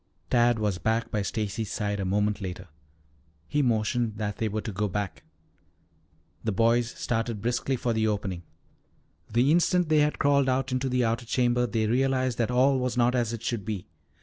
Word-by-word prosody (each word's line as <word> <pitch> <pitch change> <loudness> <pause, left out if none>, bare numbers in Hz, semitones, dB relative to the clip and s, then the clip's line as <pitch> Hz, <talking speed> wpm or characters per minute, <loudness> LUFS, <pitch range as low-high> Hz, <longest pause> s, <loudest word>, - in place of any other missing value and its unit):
Tad 120 -1 +4
was 105 -4 -1
back 115 +1 0
by 105 - 0
Stacy's 105 0 -3
side 105 -1 -2
a 100 - -1
moment 105 +2 0
later. 90 -1 -6 0.8
He 150 - +1
motioned 115 -2 0
that 105 -1 -3
they 110 - -1
were 110 +1 -2
to 110 - -5
go 105 +2 -1
back. 100 -3 -4 1.2
The 110 - 0
boys 115 +3 +2
started 115 -3 -2
briskly 120 +4 -1
for 120 -1 -1
the 110 0 +1
opening. 100 -4 -2 0.9
The 120 +6 +3
instant 175 0 +3
they 155 -1 +4
had 150 0 +2
crawled 140 -1 +3
out 130 +1 0
into 130 +1 0
the 125 -1 +1
outer 115 +1 -1
chamber 125 0 +2
they 110 -2 0
realized 130 +1 +1
that 115 - +1
all 130 +2 +3
was 125 -1 -2
not 120 0 +3
as 120 -3 0
it 115 -1 -6
should 115 -4 -2
be. 100 -2 -4
115 Hz, 185 wpm, -27 LUFS, 105-125 Hz, 1.2 s, Tad